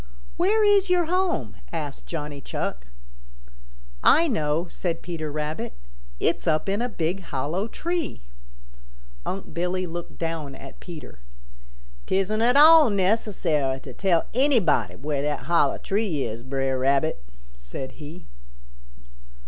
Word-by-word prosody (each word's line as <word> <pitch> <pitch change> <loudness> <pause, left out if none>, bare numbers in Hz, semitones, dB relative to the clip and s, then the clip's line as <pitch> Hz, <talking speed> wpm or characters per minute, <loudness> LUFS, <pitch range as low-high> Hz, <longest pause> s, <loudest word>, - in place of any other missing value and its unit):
"Where 420 +5 +3
is 405 -2 +4
your 355 -1 +3
home?" 365 +1 0
asked 150 -4 -5
Johnny 150 -3 -5
Chuck. - - -4 1.2
"I 335 +2 +6
know," 160 - 0
said 170 -1 -3
Peter 160 -4 -4
Rabbit. 150 - -3 0.5
"It's - - 0
up 155 +2 +2
in 200 +3 0
a 245 - -1
big 175 -2 -1
hollow 165 +6 -2
tree." 340 - -3 1.0
Unc' 195 - -4
Billy 180 +2 -1
looked 175 0 -7
down 165 -4 -3
at 135 - -11
Peter. 160 - -10 0.9
"'Tisn't 195 +3 +1
at 245 +3 +4
all 310 -1 +9
necessary 185 -9 +1
to 130 - -9
tell 180 -1 +2
anybody 250 - +3
where 145 -1 -2
that 145 -1 -1
hollow 145 +1 +2
tree 195 -8 -1
is, 115 +1 -4
Bre'r 135 +1 -1
Rabbit," 135 - +1 0.4
said - - -7
he. 155 +5 -9
170 Hz, 125 wpm, -25 LUFS, 145-220 Hz, 1.2 s, all